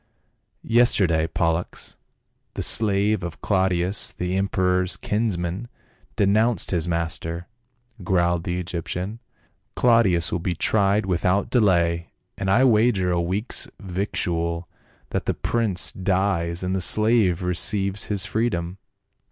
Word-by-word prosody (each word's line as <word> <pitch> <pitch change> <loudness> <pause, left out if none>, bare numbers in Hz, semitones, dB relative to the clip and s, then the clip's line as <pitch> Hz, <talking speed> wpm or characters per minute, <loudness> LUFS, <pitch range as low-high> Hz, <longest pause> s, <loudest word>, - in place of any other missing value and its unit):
" - - -49 0.2
Yesterday 85 -9 +3
Pollux, 85 +1 -2 0.6
the - - -2
slave 105 -1 +3
of 85 -2 -6
Claudius 95 -1 0
the 90 +1 -3
em 95 +1 0
peror's 90 -1 +1
kinsman, 100 -1 -2 0.5
denounced 105 +1 +2
his 85 -2 0
master," 85 0 -2 0.6
growled 85 -2 +1
the 90 0 -2
Egyptian. 90 +4 -4 0.3
" - - -46
Claudius 115 -9 +3
will 85 - -1
be 90 +1 -2
tried 100 +3 +1
without 90 +2 0
delay, 85 -7 +2 0.3
and 95 - -3
I 115 +7 +4
wager 110 -6 +3
a 85 -1 +1
week's 95 +7 -2
victual 85 -3 -2 0.4
that - - -2
the - - 0
prince 110 -6 0
dies 90 -2 -1
and 90 +1 -1
the 95 - -1
slave 105 -3 +2
receives 95 +3 0
his 100 -3 0
freedom." 95 -5 -2
95 Hz, 125 wpm, -23 LUFS, 85-105 Hz, 0.6 s, I